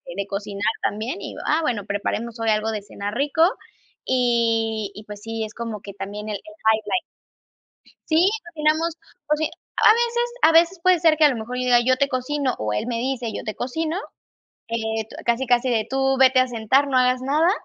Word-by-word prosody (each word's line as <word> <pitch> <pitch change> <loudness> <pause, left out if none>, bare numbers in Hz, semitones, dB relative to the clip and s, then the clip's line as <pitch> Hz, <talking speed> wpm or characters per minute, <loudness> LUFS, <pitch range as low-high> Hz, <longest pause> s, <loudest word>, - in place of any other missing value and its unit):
de 200 0 -3
cocinar 200 0 -5 0.2
también 220 - -2
y, - - -7
ah, 310 +2 +2
bueno, 235 -9 -1
preparemos 220 +3 -3
hoy 225 -1 0
algo 215 +1 0
de 210 -2 -3
cenar 205 0 -6
rico 290 +5 +2 0.6
y 230 -4 +1
y, 210 - -9
pues, 210 -1 -10
sí, 225 0 -4
es 215 - -7
como 225 -3 -5
que 200 - -9
también 205 +2 -6
el 210 - -2
el - - -18 0.2
highlight. 220 - +2 1.1
Sí, 320 +3 +4 0.2
cocinamos, 315 0 0 0.3
coci 300 +1 0 0.3
A - - +6
veces 475 +1 +1
a 325 - +6
veces 335 +3 +4
puede 365 0 +5
ser 320 -2 +4
que 310 - +6
a - - +7
lo 260 - -1
mejor 235 +3 -5
yo 250 - -1
diga: 245 -1 +5
"Yo 255 0 +3
te 280 - +2
cocino", 260 +1 -1
o 110 -1 -2
él 105 - -2
me 230 -1 -2
dice: 245 -3 -2
"Yo - - -5
te 215 - -4
cocino", 320 - -3 0.7
eh, 220 -1 -2
tu, - - -10
casi, 240 +2 +1
casi 245 +1 +2
de 225 -3 +1
tú 270 0 +1
vete 260 -1 +6
a 255 - +2
sentar, 245 +5 +2
no 265 - 0
hagas 255 0 +3
nada, 300 +6 +2
245 Hz, 205 wpm, -23 LUFS, 220-290 Hz, 1.1 s, a